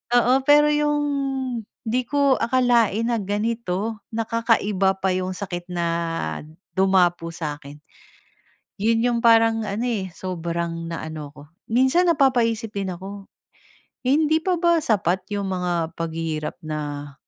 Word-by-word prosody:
Oo, 245 +2 +4
pero 295 +1 +6
'yung 295 0 +1 0.8
'di 240 +2 -1
ko 280 -3 +3
akalain 235 -3 +2
na 230 - +1
ganito, 210 0 -2
na 225 0 0
kakaiba 210 -5 +1
pa 190 -1 +1
'yung 185 0 -2
sakit 175 -3 -5
na 175 -1 -1 0.9
dumapo 185 -3 +3
sa'kin. 150 -3 -6 1.1
'Yun 225 +2 +2
'yung 240 -1 +1
parang 225 -1 +5
ano, 215 +3 -3
eh, 205 -6 -1
sobrang 170 -2 -4
na 165 - -4
ano 155 -2 -6
'ko. 145 - -11 0.3
Minsan 265 +9 +3
napapaisip 235 -7 +2
din 195 -1 -2
ako. 195 +2 -9 0.7
Hindi 305 +4 +2
pa 360 +1 0
ba 340 -1 +3
sapat 190 - +1
'yung 205 -1 -2
mga 175 -3 -1
paghihirap 160 -2 -3
na 145 -2 -5
205 Hz, 130 wpm, -23 LUFS, 175-240 Hz, 1.1 s, pero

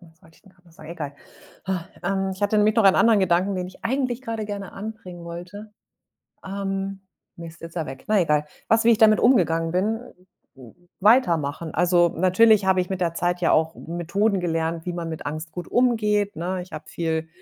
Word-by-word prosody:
was 165 -2 -21
wollt 165 0 -20
ich - - -25
denn 195 - -21
grad 180 -1 -30
noch 170 - -21
sagen? 155 -2 -13
Egal. 150 -4 -6 0.5
Ha, 185 -2 -3
ähm, 195 +1 -1
ich 190 - -9
hatte 205 +1 +2
nämlich 210 0 +3
noch 225 - +4
einen 195 - +6
anderen 225 -3 +5
Gedanken, 185 +2 +2
den 180 -1 -3
ich 185 - -15
eigentlich 255 0 -1
grade 225 -3 -4
gerne 200 -2 -6
anbringen 195 -4 -8
wollte. 185 +5 -9 0.7
Ähm, 195 0 -4 0.4
Mist, 170 0 -10
jetzt 165 - -8
ist - - -19
er 160 -3 -2
weg, 130 0 -9
na 210 -2 +4
egal. 150 -3 +1 0.2
Was 225 0 +3
wie 235 - +6
ich 225 - +4
damit 215 -1 +5
umgegangen 165 -9 +3
bin? 210 +5 0 0.6
Äh, 125 -4 -13 0.3
weitermachen. 170 - +2
Also, 175 +1 +4
natürlich 195 +5 +4
habe 190 -1 +3
ich 180 - -4
mit 190 -1 -3
der 170 -2 0
Zeit 175 +1 -1
ja 175 - +2
auch 160 +1 +2
Methoden 190 +5 -1
gelernt, 165 -1 -2
wie 180 - -2
man 170 -1 -4
mit 160 -1 -6
Angst 155 +3 -5
gut 175 -1 -7
umgeht, 210 -6 +1
ne? 180 +3 -3
Ich 180 - -15
habe - - -7
viel 160 -1 -2
185 Hz, 210 wpm, -23 LUFS, 165-205 Hz, 0.7 s, einen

